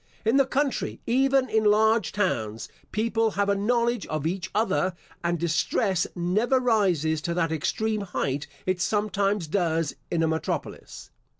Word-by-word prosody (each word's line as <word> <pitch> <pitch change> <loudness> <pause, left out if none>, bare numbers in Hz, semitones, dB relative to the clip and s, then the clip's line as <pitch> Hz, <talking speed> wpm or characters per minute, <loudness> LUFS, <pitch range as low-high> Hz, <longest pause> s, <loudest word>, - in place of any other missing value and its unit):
In 225 +5 +3
the 275 -1 +4
country, 280 0 -1
even 265 +2 +3
in 220 -2 +1
large 215 0 +3
towns, 110 - -2 0.2
people 225 +1 +1
have 200 0 +2
a 200 - +3
knowledge 235 +2 0
of 155 -1 -3
each 185 +2 -2
other, 190 -4 +1 0.3
and 170 0 0
distress 170 +3 0
never 210 +9 +1
rises 180 - +1
to 170 +1 -2
that 165 -2 0
extreme 215 +7 -1
height 145 -7 -2 0.2
it 185 -1 0
sometimes 205 -2 0
does 165 -2 0
in 165 -1 0
a - - +3
metropolis. 160 0 -4
200 Hz, 145 wpm, -26 LUFS, 170-220 Hz, 0.3 s, the